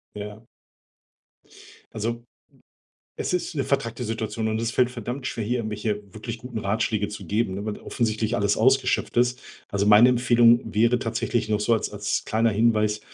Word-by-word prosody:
Ja. 105 +2 -8 1.5
Also, 115 +2 -3 0.9
es - - -2
ist 180 -1 -2
'ne 140 - 0
vertrackte 125 -3 -1
Situation 110 0 -3
und 110 +1 -1
es 115 0 -1
fällt 125 0 +2
verdammt 125 +2 -5
schwer, 115 - -3
hier 120 +4 0
irgendwelche 105 -1 -2
wirklich 110 +1 -6
guten 120 -1 -6
Ratschläge 105 0 -1
zu 105 - -8
geben, 100 -2 -1
weil 105 -1 -4
offensichtlich 110 -1 -1
alles 100 -2 +1
ausgeschöpft 130 +3 +2
ist. 125 +1 +2 0.3
Also, 100 0 -1
meine 105 +4 +8
Empfehlung 120 -1 +5
wäre 115 +3 +3
tatsächlich 115 -1 -2
noch 105 -1 0
so 115 - +1
als 110 - -2
als 105 0 -2
kleiner 115 +1 +1
Hinweis 105 -1 +2
115 Hz, 160 wpm, -24 LUFS, 105-120 Hz, 1.5 s, meine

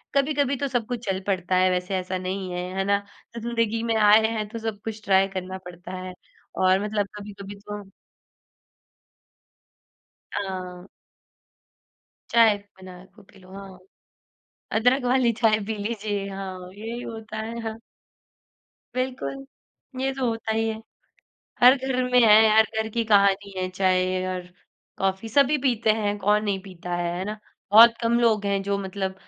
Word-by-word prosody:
कभी-कभी 280 -1 +2
तो 280 - -1
सब 245 -3 -1
कुछ 245 -1 -5
चल 190 -1 0
पड़ता 185 -1 0
है 185 0 +4
वैसे 180 +1 -1
ऐसा 185 0 -3
नहीं 185 0 -4
है, 180 0 -3
है 195 - +1
ना? 200 0 +2 0.4
ज़िंदगी 230 -1 -1
में 230 -1 0
आए 215 +1 +6
हैं 220 -2 -3
तो 230 - -6
सब 220 -2 -4
कुछ 220 -1 -6
ट्राई 195 0 +4
करना 185 0 -5
पड़ता 180 +1 -10
है 185 0 -7 0.4
और 185 0 +4
मतलब 210 -1 -1
कभी-कभी 200 -1 -9
तो 205 0 -7 2.5
हाँ। 185 -2 -5 1.4
चाय 230 -3 +5 0.2
बनाए 185 -1 -12
को 210 - -17
पी 195 0 -20
लो, 185 0 -17
हाँ। 195 -1 -10 0.9
अदरक 245 +4 +2
वाली 245 -1 +3
चाय 220 -2 +4
पी 220 - -2
लीजिए, 205 -2 -3
हाँ 190 -2 -7
यही 225 +4 -6
होता 220 -2 -7
है, 225 +2 -5
हाँ। 225 -1 -5 1.2
बिल्कुल। 260 +1 -3 0.6
ये 270 +1 0
तो 265 -1 -1
होता 225 -1 -3
ही 225 0 0
है। 220 - -2 0.9
हर 250 +2 +9
घर 260 -1 -1
में 250 - +6
है, 220 -1 +7
हर 220 - +7
घर 220 0 0
की 230 -1 +1
कहानी 200 -1 +3
है 185 0 -2
चाय 185 0 +1
और 180 -1 -5 0.5
कॉफी 195 +3 -1
सभी 280 +5 +3
पीते 235 -5 +2
हैं 205 -1 -1
कौन 210 +2 +2
नहीं 200 -2 0
पीता 180 -2 -7
है, 175 0 -2
है 185 - -3
ना? 210 +2 -5 0.3
बहुत 230 +2 +9
कम 235 +1 +2
लोग 220 -3 +2
हैं 200 0 +1
जो 200 0 -1
मतलब 190 -1 -4
205 Hz, 160 wpm, -24 LUFS, 190-230 Hz, 2.5 s, हर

